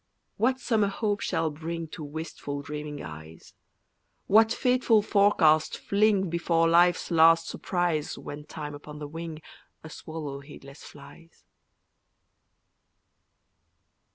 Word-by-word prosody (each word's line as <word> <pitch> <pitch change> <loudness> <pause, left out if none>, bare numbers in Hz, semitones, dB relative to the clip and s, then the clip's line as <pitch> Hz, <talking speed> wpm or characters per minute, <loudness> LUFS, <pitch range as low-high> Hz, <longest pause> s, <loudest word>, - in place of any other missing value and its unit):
What 255 +3 +1
summer 225 -4 +1
hope 205 0 -1
shall 160 -1 -1
bring 165 +2 -5
To 155 - -8
wistful 145 -1 -6
dreaming 150 0 -6
eyes? 80 0 -11 0.7
What 220 +2 +5
fateful 250 -3 +2
forecast 185 -7 +3
fling 200 -1 +2
Before 165 0 +1
life's 175 +2 +3
last 165 0 +5
surprise 175 -5 -2
When 145 +1 -8
Time 150 -1 -7
upon 150 +1 -10
the 150 -1 -6
wing, 160 0 -7 0.4
A 160 - -10
swallow 150 -4 -7
heedless 140 0 -13
flies? 165 +3 -15
165 Hz, 110 wpm, -27 LUFS, 150-195 Hz, 0.7 s, What